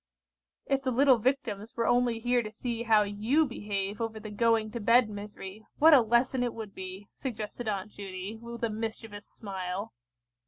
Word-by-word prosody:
"If 275 0 +1
the 265 - -1
little 260 0 +5
Victims 225 -4 -1
were 230 - +1
only 245 -1 +3
here 245 +2 +2
to 215 -2 -6
see 235 0 -4
how 220 -3 +4
you 215 +10 +2
behave 205 -4 -3
over 225 -1 -3
the 215 -1 -8
going 225 0 +2
to 235 - -4
bed 230 +1 +4
misery, 205 0 -8
what 320 +2 +7
a 275 - +8
lesson 240 +3 +2
it 245 -1 -1
would 215 -3 -7
be!" 190 +2 -8
suggested 230 -2 -5
Aunt 200 0 -3
Judy, 195 +1 -6
with 235 0 -8
a 230 - +1
mischievous 220 -1 -5
smile. 195 0 -5
225 Hz, 180 wpm, -29 LUFS, 205-240 Hz, -, a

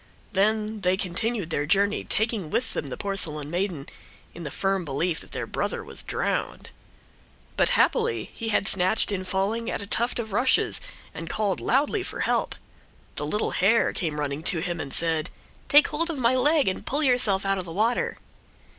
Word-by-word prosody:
Then 215 +2 +1
they 185 0 +2
continued 195 0 -2
their 145 -1 -1
journey, 200 +4 +2
taking 220 -6 -1
with 240 - -1
them 145 - -3
the 130 - -5
porcelain 155 -7 0
maiden, 175 -5 -2 0.5
in 170 - -10
the 150 - -4
firm 195 +3 -1
belief 160 +3 -1
that - - -13
their - - -3
brother - - -3
was - - -4
drowned. - - -3 0.8
But - - +3
happily 115 -2 +1
he 225 - -4
had 200 -2 +1
snatched 190 +3 +4
in 190 -2 -2
falling 195 +5 -1
at - - -2
a 200 - -5
tuft 235 +4 +1
of 225 -3 -3
rushes 245 +5 +2 0.3
and 165 - -7
called 205 -4 0
loudly 290 - +1
for - - -5
help. - - 0 0.6
The 150 - -4
little 210 +8 0
hare 210 +5 +3
came 155 -4 -2
running 145 0 -2
to 180 - +1
him 170 +1 -3
and 140 - -5
said: 160 -2 +1 0.4
"Take 295 +1 +7
hold 330 +3 +1
of 330 - -3
my 245 -1 +2
leg 290 +2 +3
and 190 - -1
pull 295 +3 0
yourself 245 -8 +2
out 195 0 +1
of 185 - -4
the 165 - -7
water." 220 +7 0
195 Hz, 185 wpm, -25 LUFS, 170-230 Hz, 0.8 s, Take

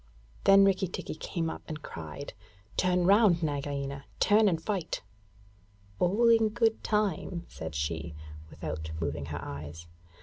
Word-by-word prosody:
Then 195 0 +8
Rikki 195 -1 +2
tikki 180 - -5
came 165 +1 -3
up - - -5
and 155 -1 -6
cried: 80 -2 -7 0.4
'Turn 180 -1 +2
round, 195 -3 +5
Nagaina; 140 -2 -3
turn 210 0 +5
and 165 -3 0
fight!' 185 0 -3 1.0
'All 205 +7 +3
in 225 -1 +5
good 225 0 +1
time,' 190 -4 0
said 80 -3 -7
she, 80 +2 -3 0.3
without 80 0 -5
moving 75 -3 -3
her 75 -1 -5
eyes. 75 +3 -7
165 Hz, 135 wpm, -30 LUFS, -, 1.0 s, Then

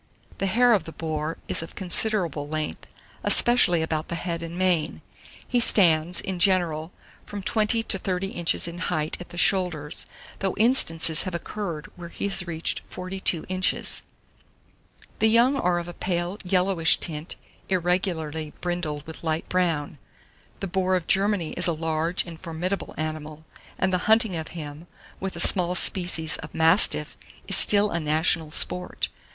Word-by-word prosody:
The 195 - 0
hair 240 +4 +4
of 205 - +1
the 165 - -8
boar 155 -1 -4
is - - 0
of 165 - -9
considerable 180 -6 0
length, 155 0 -4 0.4
especially 175 -9 +4
about 160 -1 -3
the 170 - -4
head 170 -1 -3
and 170 +1 -7
mane; 180 -4 0 0.4
he 245 - +1
stands, 175 -6 +5
in 190 -2 -4
general, 175 -4 +1 0.3
from 205 -1 -8
20 220 +2 +3
to 195 - -1
30 185 +1 -2
inches 170 -2 +1
in 170 +1 -7
height 155 -4 -1
at 175 - -10
the 175 - -11
shoulders, 175 -7 +1 0.3
though 195 -1 -2
instances 165 -9 +4
have 185 -2 -3
occurred 170 -4 -5
where 175 -1 -9
he 200 - -4
has 190 -2 +1
reached 165 -1 -2
42 185 -2 +2
inches. 185 0 0 1.2
The 220 - +4
young 240 +5 +4
are 180 -10 +1
of 170 0 -4
a 175 - -7
pale 175 +3 -3
yellowish 180 -2 +2
tint, 155 0 -3 0.3
irregularly 170 -4 -1
brindled 165 -5 -4
with 160 +1 -10
light 160 0 -2
brown. 165 -6 -1 0.6
The 195 - -2
boar 185 0 0
of 180 -3 -2
Germany 195 -4 +1
is - - 0
a 170 - +1
large 160 +2 -1
and 165 -2 -10
formidable 180 +3 -4
animal, 155 0 -5 0.3
and 190 0 0
the 180 - +2
hunting 220 -4 +4
of 160 -1 -4
him, 150 +1 -8 0.3
with 190 -1 -5
a - - -7
small 180 +1 +2
species 175 -4 +2
of 150 - -10
mastiff, 165 +5 +3 0.3
is - - +3
still 205 0 +5
a 170 - -1
national 155 +1 0
sport. 90 - -1
175 Hz, 160 wpm, -25 LUFS, 160-190 Hz, 1.2 s, stands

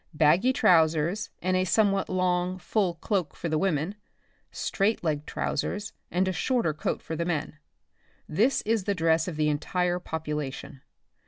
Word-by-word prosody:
Baggy 165 +11 +4
trowsers 165 -2 +3
and 185 +1 +1
a 185 - +2
somewhat 195 +1 +2
long, 180 0 0
full 185 -1 0
cloak 185 -3 -2
for 170 - -4
the 155 - +1
women 165 0 0 0.3
— - - -41
straight 205 +1 0
legged 150 -3 -1
trowsers 205 +8 -2 0.2
and 185 +2 +1
a 190 - 0
shorter 230 -2 0
coat 150 - -3
for 160 - -4
the 170 - -1
men, 160 -3 -3 0.7
this 225 - +2
is 220 -3 0
the 200 - 0
dress 165 -1 +2
of 175 - -4
the 150 0 +1
entire 175 +4 0
population. 150 -4 -5
175 Hz, 160 wpm, -27 LUFS, 155-195 Hz, 0.7 s, Baggy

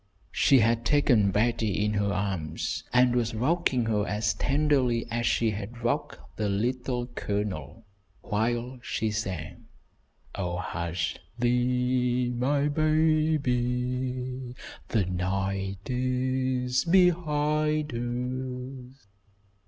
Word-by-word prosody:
She 135 - +4
had 115 +1 +2
taken 120 -8 +4
Betty 105 -1 +1
in 105 - 0
her 100 -1 +1
arms, 95 -6 -2
and 125 0 +4
was 115 -2 0
rocking 130 -1 +1
her 105 -2 +1
as 105 0 0
tenderly 135 -5 +1
as 120 0 0
she 115 -2 +2
had 110 +4 -7
rocked 120 - -1 0.2
the 105 -1 0
Little 120 +4 -1
Colonel, 105 -2 -4 0.4
while 120 +4 -1
she 110 -2 -2
sang, 95 -7 -4 0.7
"Oh, 90 -3 -3
hush 85 -2 -3 0.2
thee, 125 0 +1
my 140 +4 +1
baby, 130 -5 0 0.3
the 110 -5 +1
night 95 +2 -2
is 130 0 0
behind 155 -4 +2 1.0
us." 135 -6 -29
120 Hz, 100 wpm, -27 LUFS, 105-130 Hz, 1.0 s, She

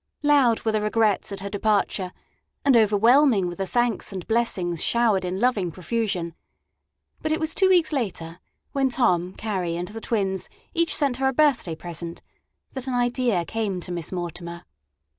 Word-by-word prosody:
Loud 280 -6 +4
were 220 - +1
the 215 -1 0
regrets 210 -1 +1
at 195 - -6
her 200 - -4
departure, 205 -3 0 0.5
and 275 -3 +5
overwhelming 225 0 +4
were 175 - -4
the 195 +2 -4
thanks 240 -1 0
and 185 -3 -6
blessings 190 -8 0
showered 225 -5 +2
in 180 +1 -3
loving 220 -7 +1
profusion; 185 -2 -2 0.9
but 310 - -2
it 315 - +1
was 320 -1 -1
two 380 - +3
weeks 345 -4 +3
later, 180 - -3 0.3
when 270 -1 +1
Tom, 180 -8 +1
Carrie, 185 -6 -2
and 175 +1 -4
the 225 +1 -8
twins 195 -5 -1 0.2
each 335 -2 +1
sent 275 -5 +1
her 265 0 +1
a 265 - +1
birthday 260 - +2
present, 170 0 -6 0.5
that 265 0 -6
an 255 - -1
idea 245 -6 +1
came 210 -3 -2
to 180 - -7
Miss 170 -3 -4
Mortimer. 170 -1 -6
215 Hz, 170 wpm, -24 LUFS, 180-245 Hz, 0.9 s, and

